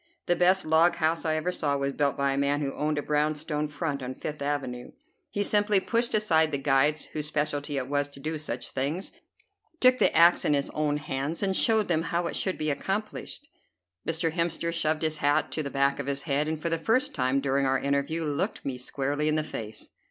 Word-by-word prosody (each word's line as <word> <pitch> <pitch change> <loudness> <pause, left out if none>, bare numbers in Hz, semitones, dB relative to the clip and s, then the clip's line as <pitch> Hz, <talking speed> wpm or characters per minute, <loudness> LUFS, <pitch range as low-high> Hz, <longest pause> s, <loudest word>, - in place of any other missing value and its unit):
The 175 - +2
best 185 +2 +3
log 160 +2 +4
house 165 0 0
I 155 -1 +1
ever 155 +3 -1
saw 145 -5 0
was 140 0 -1
built 140 -1 0
by 140 0 +1
a - - -2
man 140 +1 +1
who 140 -1 -2
owned 150 0 -1
a 145 - -1
brown 150 +1 +1
stone 150 0 -2
front 145 -1 -3
on 130 0 -5
Fifth 150 -1 -6
Avenue. 135 -4 -3 0.4
He 205 -7 -1
simply 205 0 +3
pushed 235 +4 0
aside 160 -7 +3
the 145 - -1
guides 140 +2 +2
whose 150 -1 0
specialty 150 -1 -1
it 130 -1 -2
was 145 0 0
to 140 -1 -11
do 155 +2 -3
such 125 -5 -5
things, 145 +8 -2 0.7
took 255 0 +5
the - - +4
axe 170 +1 +6
in 150 - +3
his 140 - -1
own 150 -1 0
hands, 145 +4 -3
and 190 -1 +1
showed 220 -1 +3
them 160 -2 +1
how 170 +1 -1
it - - -3
should 190 - -1
be 155 -1 0
accomplished." 210 - -4 0.6
Mr. 165 0 -1
Hemster 170 0 -1
shoved 160 -1 0
his 155 -1 +1
hat 145 0 +1
to 155 - -2
the 140 - -4
back 140 +1 +1
of 140 - -4
his 140 0 -2
head, 145 0 0
and 160 0 -2
for 170 - -2
the 165 0 0
first 255 - +1
time 130 0 +1
during 135 0 +1
our 135 0 +2
interview 140 +4 -1
looked 145 -2 -2
me 130 -2 -3
squarely 140 +4 -1
in 155 - +2
the 155 - +1
face. 110 -7 -7
150 Hz, 225 wpm, -27 LUFS, 140-165 Hz, 0.7 s, axe